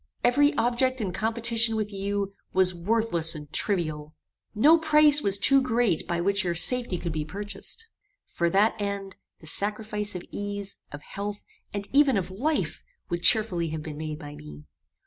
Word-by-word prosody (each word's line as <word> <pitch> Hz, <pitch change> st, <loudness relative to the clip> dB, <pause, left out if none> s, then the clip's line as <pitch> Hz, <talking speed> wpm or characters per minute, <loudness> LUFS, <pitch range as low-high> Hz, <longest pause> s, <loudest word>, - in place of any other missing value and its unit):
Every 285 Hz, +4 st, +4 dB
object 255 Hz, +2 st, +1 dB
in 195 Hz, -5 st, -3 dB
competition 230 Hz, 0 st, +2 dB
with 215 Hz, -1 st, -3 dB
you, 200 Hz, 0 st, -3 dB, 0.2 s
was 185 Hz, -1 st, +3 dB
worthless 175 Hz, -3 st, -1 dB
and 150 Hz, -1 st, -10 dB
trivial. 155 Hz, -6 st, -1 dB, 0.4 s
No 305 Hz, +10 st, +5 dB
price 300 Hz, -2 st, +5 dB
was 200 Hz, -4 st, +2 dB
too 275 Hz, +7 st, +5 dB
great 235 Hz, -8 st, 0 dB
by 170 Hz, -1 st, -1 dB
which 200 Hz, +3 st, +1 dB
your 175 Hz, -2 st, -2 dB
safety 240 Hz, +2 st, +3 dB
could 170 Hz, -1 st, -4 dB
be 155 Hz, -1 st, -3 dB
purchased. 205 Hz, -, -5 dB, 0.4 s
For 170 Hz, 0 st, -1 dB
that 200 Hz, +5 st, +3 dB
end, 200 Hz, -1 st, -4 dB, 0.2 s
the -, -, -14 dB
sacrifice 210 Hz, +3 st, 0 dB
of 180 Hz, -, -5 dB
ease, 205 Hz, -1 st, -5 dB
of 145 Hz, +1 st, -9 dB
health, 205 Hz, +1 st, -6 dB, 0.3 s
and 200 Hz, 0 st, -4 dB
even 275 Hz, -4 st, +4 dB
of 185 Hz, -1 st, -3 dB
life, 290 Hz, +11 st, -2 dB, 0.3 s
would 175 Hz, 0 st, -3 dB
cheerfully 180 Hz, -6 st, +2 dB
have 155 Hz, 0 st, -5 dB
been 155 Hz, -2 st, -7 dB
made 155 Hz, -1 st, -5 dB
by 145 Hz, -2 st, -9 dB
me. 75 Hz, -, -12 dB
200 Hz, 165 wpm, -26 LUFS, 170-230 Hz, 0.4 s, No